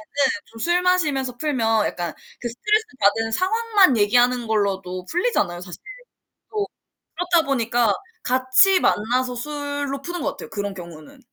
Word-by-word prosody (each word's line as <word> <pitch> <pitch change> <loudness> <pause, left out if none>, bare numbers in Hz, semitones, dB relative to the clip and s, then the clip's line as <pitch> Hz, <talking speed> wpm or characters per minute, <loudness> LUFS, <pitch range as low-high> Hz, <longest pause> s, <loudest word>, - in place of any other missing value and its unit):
때는 280 -2 +3 0.2
좀 225 - -15
술 345 +8 +2
마시면서 295 -9 +1
풀면 230 -7 +1
약간 175 -2 -3 0.3
그 240 - -3
스트레스 425 - +1
받은 225 +3 +2
상황만 395 - +3
얘기하는 245 +3 +3
걸로도 190 -4 -1
풀리잖아요, 260 - 0
사실 180 -1 -9 0.7
또. 420 -2 -1 0.5
그렇다 345 -1 +2
보니까 240 -4 +1 0.3
같이 260 +10 +4
만나서 250 +2 +1
술로 285 0 -4
푸는 350 +3 -5
것 285 -1 -1
같아요, - - -10
그런 200 -1 -4
경우는. 170 - -11
255 Hz, 325 characters per minute, -22 LUFS, 220-340 Hz, 0.7 s, 같이